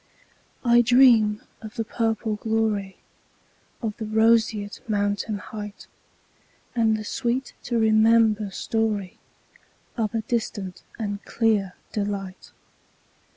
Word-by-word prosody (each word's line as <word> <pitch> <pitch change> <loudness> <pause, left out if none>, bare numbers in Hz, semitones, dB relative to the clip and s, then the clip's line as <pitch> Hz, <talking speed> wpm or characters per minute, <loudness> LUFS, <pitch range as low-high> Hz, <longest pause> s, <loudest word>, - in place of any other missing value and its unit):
I 240 0 +6
dream 235 -4 +5 0.2
of 215 -1 -9
the 225 - -1
purple 225 -1 -1
gloryOf 215 -3 -1 1.0
the 220 - -4
roseate 220 -1 +2
mountain 205 +1 0
heightAnd 210 0 -8 1.1
the 215 - -5
sweet 245 +4 -2
to 240 - 0
remember 220 -1 +4
storyOf 205 -1 -2 0.8
a 225 0 -1
distant 205 -5 -3 0.2
and 205 -2 -4
clear 210 -5 +1 0.2
delight. 200 -2 -4
220 Hz, 90 wpm, -24 LUFS, 205-225 Hz, 1.1 s, I